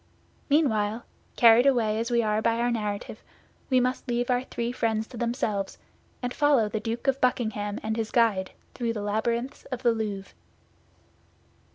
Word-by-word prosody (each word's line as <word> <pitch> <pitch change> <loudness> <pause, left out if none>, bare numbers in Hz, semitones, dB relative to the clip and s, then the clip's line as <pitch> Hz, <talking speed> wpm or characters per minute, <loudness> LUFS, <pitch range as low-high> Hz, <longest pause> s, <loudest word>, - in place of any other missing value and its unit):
Meanwhile, 230 -7 +1 0.3
carried 235 +2 +6
away 225 -5 +2
as 230 +2 -2
we 235 -1 +2
are 215 0 +1
by 230 +1 +1
our 240 +1 +1
narrative, 210 -1 -3 0.5
we 255 -1 +4
must 255 +2 -1
leave 245 +1 0
our 245 0 +2
three 235 -2 -3
friends 225 -3 -1
to 245 - -10
themselves, 225 -4 -2 0.5
and 245 0 -2
follow 290 -7 +3
the 215 +1 -3
Duke 230 +3 -4
of 270 0 +1
Buckingham 220 -5 0
and 220 0 -1
his 225 -1 -2
guide 215 -6 +2 0.2
through 235 -2 -2
the 210 -2 -4
labyrinths 235 +5 -2
of 255 -1 -6
the 240 - +5
Louvre. 210 -4 -4
230 Hz, 165 wpm, -27 LUFS, 215-245 Hz, 0.5 s, carried